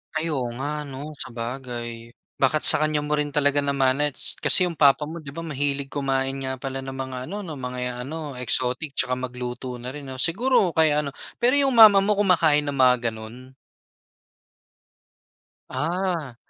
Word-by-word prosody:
Ay, 160 +1 -1
oo 130 -6 -2
nga, 150 +2 -3
'no, 145 +2 -8
sabagay. 120 -1 -6 0.2
Baka 140 +3 +2
sa 150 - +2
kaniya 155 -1 +1
mo 150 0 -1
rin 150 -1 -1
talaga 145 0 +2
namana, 140 +1 +1
ts - - -7
kasi 180 -1 +5
'yong 170 - -5
papa 145 0 +4
mo, 160 0 -8
'di 140 - -7
ba, 165 - -8
mahilig 145 -3 -2
kumain 135 -1 -1
nga 130 -1 -4
pala 135 0 -5
ng 135 - -6
mga 130 -1 -5
ano, 205 - -4
'no, 155 - -6
mga 125 -1 -4
ano, 150 -1 -6
exotic, 125 +3 0
'tsaka 130 -2 0
magluto 125 0 -6
na 120 - -8
rin, 145 +2 -7
'no. 130 - -7
Siguro 200 - +2
kaya 155 -2 +4
ano 140 -2 -3 0.2
pero 245 +3 +3
'yong 275 -1 +3
mama 215 -5 +8
mo 210 - +1
kumakain 160 -7 +3
ng 140 - -2
mga 130 -2 +5
gano'n? 115 +4 -8 2.1
Ah. 165 -1 -2
140 Hz, 170 wpm, -24 LUFS, 130-155 Hz, 2.1 s, mama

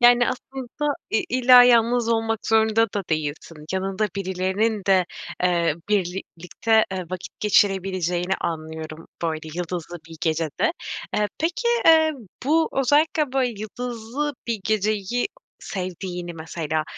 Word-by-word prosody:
Yani, 245 0 +6
aslında 265 +3 -3 0.2
i 220 - +1
illa 250 0 +7
yalnız 240 -1 +4
olmak 225 -1 0
zorunda 220 0 +4
da 205 - -1
değilsin. 155 0 -3
Yanında 195 +2 -1
birilerinin 195 +3 0
de, 190 -2 +4 0.4
eee, 170 -3 +2
birlikte 190 +2 0
eee, 185 -1 -3
vakit 185 -1 -7
geçirebileceğini 190 -3 +2
anlıyorum 160 -1 -5 0.2
böyle 160 -1 -2
yıldızlı 175 0 -4
bir 165 - -10
gecede. 160 - 0 0.4
Eee, 210 0 +1
peki, 350 +10 0 0.2
eee, 320 -1 +6 0.3
bu 320 +4 +3
özellikle 290 +2 +2
böyle 265 -2 +2
yıldızlı 245 +6 -4
bir 230 -3 -2
geceyi 215 +2 0 0.3
sevdiğini 180 -2 -5
mesela, 160 -1 -3
205 Hz, 115 wpm, -23 LUFS, 175-245 Hz, 0.4 s, illa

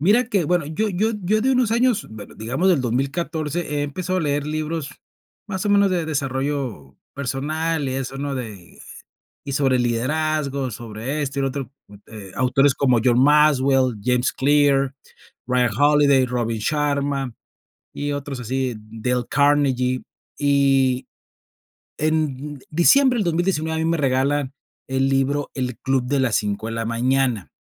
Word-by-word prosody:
Mira 210 - +4
que, 195 -7 +1
bueno, 175 -1 +1
yo 185 +9 -1
yo 210 +4 0
yo 215 +4 +1
de 260 - +2
unos 250 -4 +2
años, 235 -2 +2
bu 110 -2 -8
digamos 135 - 0
del 170 -7 +3
2014 150 +6 -2
he 145 -3 -3
empezado 185 +6 -2
a - - -1
leer 145 -1 -1
libros, 155 -1 -3 0.6
más 190 -1 -3
o - - +1
menos, 200 -1 +4
de 175 -3 0
desarrollo 135 - -3 0.2
personal 145 +3 -2
y 130 - -3
eso, 135 0 -4
¿no?, 140 -1 -3
de 105 -9 -8 0.7
y 140 - -3
sobre 135 -3 +2
liderazgo, 140 +2 -1
sobre 115 +7 -5
esto 140 -1 -4
y - - +1
lo 135 - +1
otro, 135 -1 -5 0.4
eh, 100 -4 -10
autores 130 +2 +3
como 130 -5 +2
John 125 0 +4
Maxwell, 135 -4 +4
James 125 +1 +1
Clear, 140 -1 +2 0.5
Ryan 125 -1 +2
Holiday, 145 -2 +5
Robin 115 -2 -2
Sharma, 140 0 -1 0.6
y 145 0 -3
otros 140 -2 -5
así, 130 +1 -2
Dale 115 +3 -3
Carnegie, 135 -3 +2 0.4
y 135 -3 +2 0.9
en 150 -2 -1
diciembre 250 - +4
del 205 - +1
2019 165 -2 0
a - - -1
mí 165 - +1
me 170 - 0
regalan 135 +1 0 0.3
el 135 0 +1
libro 135 +2 0
"El 125 -3 -3
Club 135 -2 0
de 140 +1 +1
las 125 -4 +2
5 105 +1 -2
de - - -5
la 115 0 -3
Mañana", 120 -3 0
140 Hz, 155 wpm, -22 LUFS, 130-155 Hz, 0.9 s, Holiday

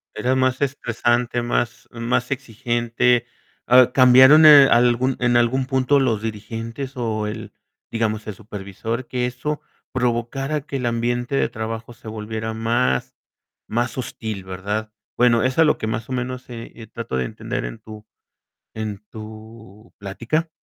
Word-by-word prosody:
Era 125 +4 0
más 130 -1 +1
estresante, 120 -3 0
más 120 -1 -2
más 120 +2 -2
exigente, 120 -1 0 0.4
ah, 125 0 +6
¿cambiaron, 130 +4 +8
eh, 145 -3 +10
algún 120 +2 +3
en 120 -1 +3
algún 125 +2 +2
punto 130 +1 +2
los 115 -5 +1
dirigentes 115 +5 -6
o 110 -3 -2
el, 105 - -7 0.4
digamos, 110 -2 -1
el 105 - -5
supervisor?, 110 +3 -6
que 125 -1 -1
eso 130 +5 -3 0.3
provocara 130 +4 -1
que 140 -1 -5
el 125 - -3
ambiente 120 +2 -1
de - - +2
trabajo 110 +1 -6
se 115 -1 -11
volviera 110 +1 -5
más 110 - 0 0.5
más 120 +3 -2
hostil, 110 -6 -5
¿verdad? 105 +4 -4 0.2
Bueno, 120 -2 +4
es 130 +3 0
a 160 - +7
lo 150 - +3
que - - -3
más 110 +1 -3
o - - -5
menos, 125 0 -4
eh 115 -1 -8
eh, 115 -1 -10
trato 110 - -5
de 65 - 0
entender - - -4
en - - -6
tu 110 -1 -12 0.7
en 105 -2 -5
tu 110 0 -12
plática. 115 +11 -2
120 Hz, 150 wpm, -22 LUFS, 110-130 Hz, 0.7 s, eh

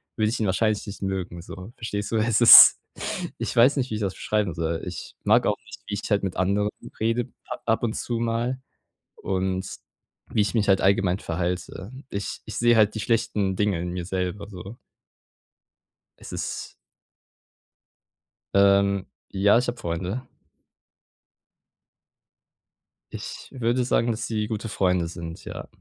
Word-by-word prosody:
würde 110 -1 +1
ich 115 - -2
ihn 110 - 0
wahrscheinlich 105 +3 +1
nicht 100 - -8
mögen 95 -3 -3
so. 90 +4 -10
Verstehst 105 -2 -4
du? 115 - +1
Es 110 +1 +2
ist 120 - +11 0.6
ich - - -4
weiß 125 +5 +5
nicht, 130 -2 -1
wie - - -1
ich 105 - -4
das 95 -3 -1
beschreiben 105 -4 -1
soll. 80 0 -2
Ich 90 -2 -7
mag - - +4
auch - - +2
nicht, - - -11
wie 105 - -5
ich - - -7
halt 100 -1 +2
mit 95 -2 -3
anderen 100 +3 +1 0.3
rede 115 +2 0 0.2
a - - -4 0.2
ab 115 - -3
und 115 -2 0
zu 120 -2 -3
mal 120 +2 -1 0.6
und 95 0 -2 0.6
wie - - +1
ich 100 - -2
mich 110 -3 +1
halt 95 -1 +4
allgemein 95 -1 +2
verhalte. 90 +3 -4 0.2
Ich 100 0 -4
ich - - -7
sehe 120 0 +4
halt 110 -1 +4
die 110 - -3
schlechten 105 -4 0
Dinge 100 -3 0
in 90 +1 -3
mir 90 -1 -4
selber 95 +2 -3
so. 100 +2 -9 1.5
Es - - -9
ist - - -5 1.8
Ähm, 100 0 +4 0.3
ja, 100 +3 +4
ich 125 - -2
hab 120 - -3
Freunde. 90 +9 -4 2.8
Ich - - -7
würde 125 -1 0
sagen, 120 -1 +2
dass 115 +1 -3
sie 105 -2 -2
gute 110 0 -4
Freunde 90 -4 +1
sind, 85 -1 -8
ja. - - -7
100 Hz, 160 wpm, -25 LUFS, 95-115 Hz, 2.8 s, ist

